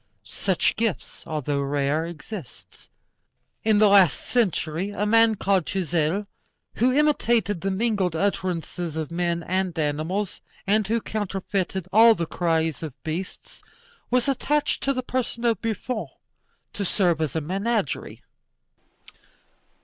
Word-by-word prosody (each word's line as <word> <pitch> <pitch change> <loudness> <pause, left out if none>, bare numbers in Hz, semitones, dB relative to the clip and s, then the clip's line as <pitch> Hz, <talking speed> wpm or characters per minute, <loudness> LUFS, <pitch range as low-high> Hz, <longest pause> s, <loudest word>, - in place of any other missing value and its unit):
Such 175 - 0
gifts, 225 -4 -3
although 145 -3 -1
rare, 145 +3 0
exist. 170 - -10 0.7
In 220 -1 +3
the 210 0 +6
last 195 -6 +5
century 185 -6 0
a 205 0 -2
man 225 +1 +5
called 195 -4 +1
Touzel, 175 +1 0 0.5
who 250 +3 +3
imitated 240 - +2
the 195 - -1
mingled 195 -4 0
utterances 175 -3 -2
of 160 -1 -4
men 170 0 -1
and 185 -1 -1
animals, 160 +6 -2 0.2
and 210 +1 +2
who 230 +2 +1
counterfeited 195 -3 -3
all 225 +2 +8
the 170 - -2
cries 160 -3 0
of 155 -5 -6
beasts, 165 +4 -6 0.5
was 250 +1 +2
attached 290 +2 0
to 275 - +1
the 255 -1 -3
person 245 -1 -2
of 230 -5 +2
Buffon 230 +2 -3 0.7
to 205 - -3
serve 175 -4 +1
as 155 -3 -2
a - - +2
menagerie. 195 - -2
190 Hz, 125 wpm, -24 LUFS, 165-220 Hz, 0.7 s, all